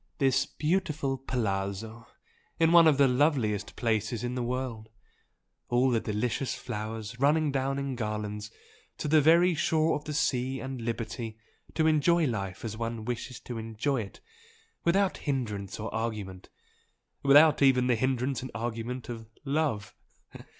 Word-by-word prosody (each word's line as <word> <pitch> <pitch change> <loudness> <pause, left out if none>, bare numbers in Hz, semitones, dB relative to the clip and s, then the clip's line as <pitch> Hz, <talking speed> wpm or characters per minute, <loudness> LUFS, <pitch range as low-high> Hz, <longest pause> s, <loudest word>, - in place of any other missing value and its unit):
This 135 -3 +2
beautiful 155 -4 -1
'palazzo,' 110 -2 -3 0.5
in 165 0 +4
one 170 -1 +8
of 150 -3 +4
the 140 -1 +6
loveliest 125 -6 +1
places 110 0 -1
in 120 0 -2
the 125 - -2
world 120 -3 -3 0.8
all 125 +2 +3
the 115 - +2
delicious 110 +5 -2
flowers 110 -1 -6
running 150 +2 +3
down 135 0 -1
in 140 -2 -3
garlands 105 -2 -4 0.5
to - - -3
the 155 +1 +5
very 170 +4 +5
shore 160 0 +2
of 150 0 -6
the 150 - -4
sea 130 -3 0
and 130 -2 -5
liberty 115 -1 -4 0.4
to 160 - +2
enjoy 160 +2 +4
life 100 -6 -3
as 110 -1 -4
one 115 -1 -4
wishes 125 +1 -4
to 120 -2 -6
enjoy 115 +4 -1
it, 100 - -10 0.6
without 190 +3 +2
hindrance 110 -10 -3
or 110 - -5
argument 105 -5 -4 0.7
without 145 +3 +6
even 130 -2 +5
the 125 - +3
hindrance 130 +2 0
and 130 - -6
argument 120 +2 -4
of 115 -2 -7 0.2
love!" 135 -9 -1
125 Hz, 145 wpm, -29 LUFS, 110-140 Hz, 0.8 s, one